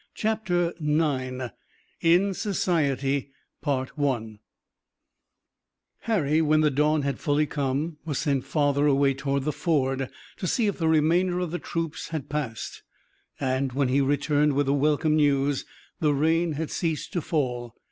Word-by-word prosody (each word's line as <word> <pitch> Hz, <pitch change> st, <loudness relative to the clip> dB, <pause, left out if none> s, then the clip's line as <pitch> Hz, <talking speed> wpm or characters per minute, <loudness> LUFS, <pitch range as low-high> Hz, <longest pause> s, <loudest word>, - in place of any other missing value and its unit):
CHAPTER 190 Hz, -6 st, 0 dB
IX 135 Hz, -5 st, 0 dB, 0.5 s
IN 180 Hz, +4 st, +4 dB
SOCIETY 140 Hz, -, 0 dB, 2.7 s
Harry, 160 Hz, -9 st, +1 dB
when 155 Hz, 0 st, +3 dB
the 150 Hz, -1 st, +3 dB
dawn 150 Hz, +2 st, +2 dB
had 140 Hz, 0 st, -2 dB
fully 150 Hz, -1 st, +2 dB
come, 145 Hz, +3 st, -2 dB
was 150 Hz, -4 st, -3 dB
sent 140 Hz, -4 st, 0 dB
farther 145 Hz, -1 st, +1 dB
away 140 Hz, -1 st, +3 dB
toward 140 Hz, 0 st, -1 dB
the 150 Hz, -, 0 dB
ford 135 Hz, -6 st, 0 dB, 0.3 s
to 185 Hz, -, -3 dB
see 230 Hz, +5 st, +1 dB
if 200 Hz, -2 st, -1 dB
the 165 Hz, -, +1 dB
remainder 170 Hz, +3 st, +3 dB
of 180 Hz, -3 st, -2 dB
the 175 Hz, -, -3 dB
troops 165 Hz, -2 st, -4 dB
had 155 Hz, -4 st, -5 dB
passed, 145 Hz, -7 st, -4 dB, 0.6 s
and, 130 Hz, -1 st, 0 dB
when 135 Hz, -1 st, +1 dB
he 135 Hz, +2 st, +3 dB
returned 145 Hz, +1 st, +2 dB
with 145 Hz, +1 st, +1 dB
the 135 Hz, -, +2 dB
welcome 150 Hz, +2 st, +2 dB
news, 140 Hz, -2 st, +2 dB, 0.3 s
the 150 Hz, -4 st, +2 dB
rain 160 Hz, +3 st, +2 dB
had 155 Hz, +1 st, -4 dB
ceased 165 Hz, 0 st, -2 dB
to 175 Hz, -, 0 dB
fall. 125 Hz, -, -2 dB
150 Hz, 140 wpm, -26 LUFS, 140-165 Hz, 2.7 s, IN